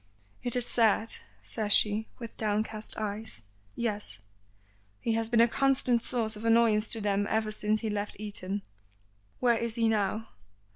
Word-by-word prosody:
"It 245 -1 0
is 245 -1 +1
sad," 225 -1 +3 0.3
says 215 -2 -3
she, 210 +1 +3
with 230 -3 -8
downcast 215 0 -2
eyes. 215 - -4 0.3
"Yes. 210 - -2 0.8
He 230 - 0
has 225 0 0
been 230 -1 +4
a 235 - +6
constant 255 -2 +3
source 225 -3 0
of 210 - -9
annoyance 225 -2 +4
to 225 - +2
them 205 0 +1
ever 220 -1 0
since 215 0 0
he 220 - -2
left 205 0 -3
Eton." 205 -1 -4 0.8
"Where 240 -2 +3
is 230 -1 -3
he 230 -1 +2
now?" 215 +1 0
220 Hz, 155 wpm, -29 LUFS, 210-230 Hz, 0.8 s, a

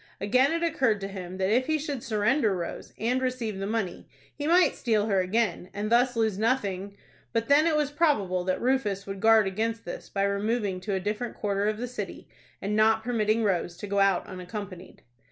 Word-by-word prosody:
Again, 255 +8 +3
it 335 +1 -1
occurred 260 -10 +1
to 195 - -3
him 185 -2 -7
that 190 +1 0
if 255 +3 +2
he 315 0 +2
should 285 -4 -4
surrender 215 0 +1
Rose, 170 -2 -6
and 245 +4 0
receive 245 -6 -2
the 195 - -3
money, 220 -4 -3 0.2
he 290 0 -4
might 350 +2 +5
steal 220 -4 +1
her 200 -3 +2
again, 185 -1 0
and 210 +2 -3
thus 245 +1 +3
lose 220 -3 0
nothing 200 -4 -1 0.4
But 230 +1 -1
then 300 +3 +5
it 320 - +2
was 295 -2 +1
probable 215 - +1
that 185 - 0
Rufus 235 -6 0
would 195 0 -6
guard 220 0 +5
against 225 +4 -2
this 175 - -7
by 195 - -1
removing 200 0 0
to 195 +1 -3
a - - 0
different 210 +5 -3
quarter 200 0 -1
of 215 0 0
the 245 +2 -4
city, 210 -6 -7 0.4
and 205 +2 -1
not 220 +1 +4
permitting 225 -2 +1
Rose 175 -4 0
to - - -6
go 200 0 0
out 195 -2 +3
unaccompanied. 185 0 -8
215 Hz, 205 wpm, -27 LUFS, 195-245 Hz, 0.4 s, might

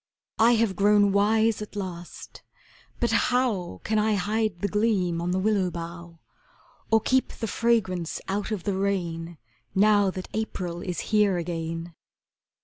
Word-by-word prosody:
I 230 +2 +6
have 225 -4 +1
grown 205 +1 +4
wise 220 +2 +2
at 210 - -8
last 180 -4 -7 0.6
but 235 - +1
how 225 - 0
Can 215 0 +1
I 215 0 +2
hide 215 +1 -1
the 205 - +1
gleam 195 -5 +1
on 175 - -2
the 180 - 0
willow 195 -1 +1
bough, 170 0 -8 0.7
Or 225 - +5
keep 260 +4 +2
the 225 - -4
fragrance 200 -8 0
out 200 +2 -2
of 210 -5 -3
the 200 - -1
rain 175 -4 -2 0.4
Now 205 0 +4
that 185 0 -6
April 180 -5 -3
is 180 -2 -3
here 205 -3 +4
again? 165 0 -4
200 Hz, 145 wpm, -26 LUFS, 175-215 Hz, 0.7 s, I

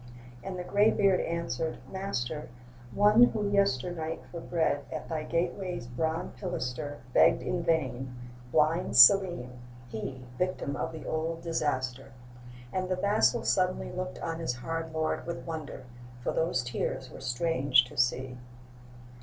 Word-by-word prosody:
And 190 -1 -5
the 180 - -4
gray 205 +4 +4
beard 195 -4 +3
answered: 160 -2 -2
'Master, 155 -7 -3 0.4
One 210 - +6
who 215 -4 -1
yesternight 170 -4 0
for 170 - -6
bread 160 -4 0
At 155 - -5
thy 160 -2 -2
gateway's 175 -1 -2
bronze 160 +7 -2
pilaster 125 +4 -4
Begged 125 - +5
in 150 +8 -1
vain: 130 -7 -1 0.4
blind 155 0 +2
Selim, 125 -3 +6 0.3
he, 125 +3 -6
Victim 180 -6 -1
of - - -3
the 160 - -9
old 165 +1 -2
disaster.' 135 -7 -2 0.6
And 185 0 -1
the 185 - +1
vassal 200 +4 +2
suddenly 185 -1 +1
Looked 185 0 -4
on 165 0 -3
his 160 -7 -2
hard 165 +6 -4
lord 160 +1 -2
with 170 - -5
wonder, 155 -5 -6 0.4
For - - 0
those 160 -6 0
tears 125 +1 -3
were - - -10
strange 130 0 +3
to 125 - -13
see. 125 0 0
160 Hz, 140 wpm, -29 LUFS, 130-180 Hz, 0.6 s, One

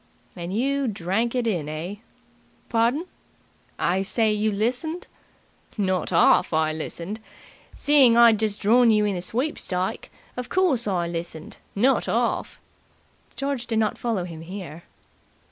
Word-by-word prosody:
"And 175 0 -6
you 275 +6 0
drank 215 +4 -1
it 245 -2 0
in, 175 -10 -1
eh?" 165 +6 -5 0.7
"Pardon?" 240 +8 +1 0.7
"I 185 +3 +1
say, 215 +2 +2
you 210 +1 0
listened?" 250 - -2 0.7
"Not 185 -3 0
'arf 170 0 +4
I 155 0 +1
listened. 170 +6 -6 0.6
Seeing 275 -5 +5
I'd 230 -3 +6
just 215 -2 0
drawn 235 +3 +4
you 210 -1 +3
in 205 - 0
the 180 - -3
sweepstike, 190 - -2 0.3
of 250 0 -5
course, 325 -12 +1
I 180 -4 0
listened 170 -2 -6 0.2
not 250 +7 +2
'arf!" - - -1 0.8
George 275 -3 -3
did 225 - -1
not 215 -1 +1
follow 225 -6 -1
him 165 -2 -8
here. 170 -2 -8
210 Hz, 135 wpm, -24 LUFS, 180-240 Hz, 0.8 s, I'd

